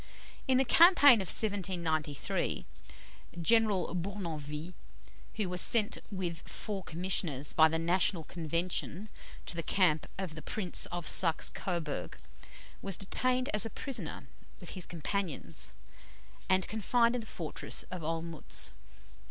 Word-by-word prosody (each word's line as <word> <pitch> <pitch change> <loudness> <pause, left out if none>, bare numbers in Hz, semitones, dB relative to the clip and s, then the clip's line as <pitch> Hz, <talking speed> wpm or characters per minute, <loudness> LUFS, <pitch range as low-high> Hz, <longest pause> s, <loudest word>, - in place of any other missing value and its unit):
In 260 -1 +4
the 265 - +3
campaign 290 - +7
of 190 - -5
1793, 170 -9 -1 0.7
General 210 -1 +2
Bournonville, 170 -4 -5 0.6
who 215 -3 -1
was 180 0 +1
sent 215 -3 +2
with 180 -4 -4
four 205 -3 -5
commissioners 160 -5 -1
by 160 0 +6
the 160 +1 -1
National 170 +1 +1
Convention 170 +5 -3 0.4
to - - -3
the 170 - -1
camp 165 -4 +2
of 185 -4 -4
the 155 - -8
Prince 185 -1 0
of 175 -1 -5
Saxe 165 -4 +5
Coburg, 165 - -4 0.6
was 195 -3 +1
detained 255 +6 +1
as 210 - +2
a 225 - -2
prisoner 220 - -4 0.3
with 180 - -9
his 185 -3 -4
companions, 160 - 0 0.8
and 185 0 +2
confined 235 +2 +1
in 250 - -2
the 220 - -11
fortress 165 -4 -5
of 180 -2 -5
Olmütz. 165 -1 0
180 Hz, 125 wpm, -31 LUFS, 165-210 Hz, 0.8 s, campaign